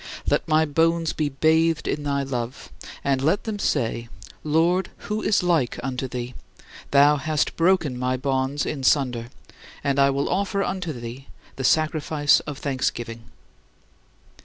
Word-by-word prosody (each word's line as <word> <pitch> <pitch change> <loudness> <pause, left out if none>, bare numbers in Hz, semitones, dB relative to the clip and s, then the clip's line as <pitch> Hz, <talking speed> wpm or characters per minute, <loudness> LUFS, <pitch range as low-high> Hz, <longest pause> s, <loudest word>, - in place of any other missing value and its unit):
Let - - +1
my 155 0 +3
bones 165 +2 +1
be 150 -2 -1
bathed 160 +2 +2
in 150 - -1
thy 140 -1 -1
love, 125 -2 -5 0.3
and 135 -1 +1
let 160 +8 +1
them 215 -2 -4
say: 115 - -1 0.3
"Lord, 170 +4 +2 0.2
who 210 +1 -2
is 210 - +2
like 160 -10 +1
unto 130 0 -3
thee? 125 0 -5 0.6
Thou 145 +1 +5
hast 155 +1 -1
broken 165 -7 +2
my 130 0 0
bonds 135 +2 -1
in 145 - -3
sunder, 125 -4 +1 0.5
I 140 0 +3
will 140 +1 0
offer 200 +1 0
unto 185 -4 -3
thee 120 +1 -8 0.3
the 135 - -5
sacrifice 155 0 +3
of 145 -2 -5
thanksgiving." 120 -4 -3
145 Hz, 140 wpm, -24 LUFS, 130-160 Hz, 0.6 s, Thou